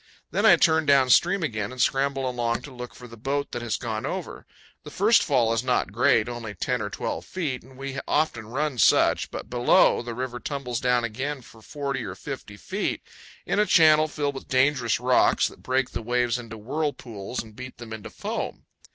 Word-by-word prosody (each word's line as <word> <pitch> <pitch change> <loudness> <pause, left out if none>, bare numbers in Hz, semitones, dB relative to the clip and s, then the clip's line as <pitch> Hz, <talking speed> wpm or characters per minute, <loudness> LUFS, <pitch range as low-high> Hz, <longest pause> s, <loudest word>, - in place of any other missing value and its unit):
Then - - +3
I - - +9
turn 160 -2 +3
down 135 -3 +5
stream 180 +7 +4
again 110 -7 -2
and 130 - -10
scramble 135 +2 +1
along 120 -2 -1
to 140 - -10
look 125 -1 -8
for 125 +2 -11
the 115 - -12
boat 140 +5 -2
that 120 - -4
has 115 -3 -2
gone 110 -3 -4
over. - - -5 0.3
The - - -10
first 210 +6 +4
fall 120 -6 +2
is 115 - 0
not 125 -6 0
great, 115 0 +3
only 115 -4 -6
10 - - -1
or - - -3
12 - - -4
feet, 150 -9 -3
and 130 +1 -17
we 135 0 -5
often 135 -8 0
run 135 +2 -2
such; - - +4
but - - -7
below, 120 0 +4
the 120 -1 -6
river 125 0 -4
tumbles 125 -5 -4
down 125 -1 +2
again 130 +4 -3
for 110 0 -16
40 140 0 -4
or 90 - -6
50 115 -3 -8
feet, 190 - -3 0.4
in - - 0
a 210 - +3
channel 155 -2 +6
filled 145 -1 -2
with 135 - -9
dangerous 130 -3 +2
rocks 125 +1 +3
that - - -16
break 130 0 0
the - - -4
waves 120 +1 0
into 115 -2 -9
whirlpools 125 -4 -4
and 110 -2 -15
beat 130 +2 -9
them 115 -2 -8
into 110 -2 -7
foam. - - -5
125 Hz, 205 wpm, -25 LUFS, 115-140 Hz, 0.4 s, I